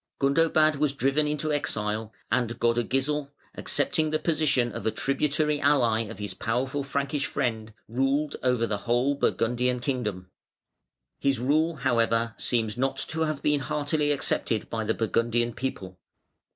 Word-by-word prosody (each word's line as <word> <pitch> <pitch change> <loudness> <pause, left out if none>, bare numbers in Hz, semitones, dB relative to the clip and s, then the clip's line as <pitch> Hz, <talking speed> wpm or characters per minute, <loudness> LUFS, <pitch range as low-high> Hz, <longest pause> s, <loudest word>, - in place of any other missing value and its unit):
Gundobad 155 +2 +3
was 145 -1 +1
driven 140 +3 +1
into 150 +1 -1
exile 110 -5 -2 0.2
and 120 -1 0
Godegisel 135 +5 0 0.2
accepting 155 +2 0
the 155 - +1
position 150 -7 +1
of - - -6
a - - +2
tributary 150 +4 0
ally 120 -6 +3
of 115 +2 -8
his 105 -3 -4
powerful 130 +8 -1
Frankish 140 0 -1
friend, 115 -5 -2 0.2
ruled 135 +5 0
over 125 -2 +2
the 105 -3 -2
whole 125 +4 +3
Burgundian 125 -2 0
kingdom. 105 -9 -3 0.9
His 140 -1 +1
rule 155 +6 +1
however 115 -4 +1
seems 115 -1 0
not 135 +1 0
to 160 0 -2
have 155 -2 -3
been 150 -1 +2
heartily 150 +1 0
accepted 115 -5 0
by 110 -1 -1
the 110 - 0
Burgundian 120 +1 0
people. 95 -8 -5
130 Hz, 140 wpm, -27 LUFS, 115-145 Hz, 0.9 s, Gundobad